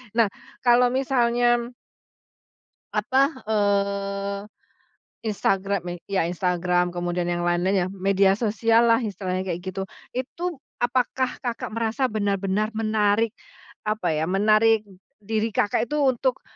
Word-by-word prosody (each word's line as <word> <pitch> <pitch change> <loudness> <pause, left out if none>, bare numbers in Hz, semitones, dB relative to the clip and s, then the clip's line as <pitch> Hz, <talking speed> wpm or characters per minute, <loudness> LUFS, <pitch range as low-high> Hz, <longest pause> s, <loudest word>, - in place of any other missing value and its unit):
nah, 225 -4 +4 0.3
kalau 245 0 +5
misalnya 240 -2 +2 1.3
apa, 265 +1 +2 0.3
eee, 200 -1 0 0.8
Instagram 200 -2 0
me 175 - -3 0.2
iya, 190 -4 +1
Instagram 180 0 0
kemudian 175 0 -2
yang 175 0 -1
lain-lain 175 +2 +2
ya, - - -3
media 195 0 +3
sosial 230 +2 +2
lah 230 - +6
istilahnya 185 -2 -3
kayak 175 -1 -3
gitu. 190 +1 -4 0.3
Itu, 320 +6 -4 0.2
apakah 250 +1 0
Kakak 240 -3 -4
merasa 230 +4 -1
benar-benar 205 0 -1
menarik, 215 0 +2 0.6
apa 215 -5 0
ya, 155 - 0
menarik 215 +4 +4 0.4
diri 220 +1 -1
Kakak 205 +3 +1
itu 300 - -1
untuk, 260 -1 +1
205 Hz, 115 wpm, -24 LUFS, 190-230 Hz, 1.3 s, lah